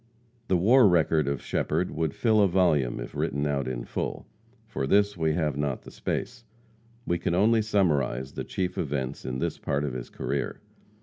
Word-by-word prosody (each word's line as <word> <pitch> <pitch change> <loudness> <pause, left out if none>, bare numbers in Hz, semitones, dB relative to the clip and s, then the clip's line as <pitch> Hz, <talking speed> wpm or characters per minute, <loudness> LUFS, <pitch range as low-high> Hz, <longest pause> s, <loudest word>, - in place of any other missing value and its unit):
The 95 - +3
war 115 +6 +6
record 80 -4 +3
of 70 -2 -2
Shepherd - - -1
would 80 -2 -2
fill 110 -3 +3
a 100 - +5
volume 85 -9 +2
if - - -7
written 70 +1 -1
out 70 -3 -1
in - - -3
full. - - -4 0.4
For 85 -12 -3
this 100 +4 +3
we 80 -2 +1
have 75 -4 0
not 70 -2 -2
the - - -11
space. 120 -1 -4 0.6
We 85 0 0
can 85 - 0
only 110 +4 +4
summarize 75 - +1
the - - -5
chief 90 -1 -3
events 70 -4 -3
in 65 0 -3
this - - -2
part 70 +1 -1
of 70 -3 -2
his 60 -1 -6
career. - - -3
80 Hz, 185 wpm, -27 LUFS, 70-95 Hz, 0.6 s, war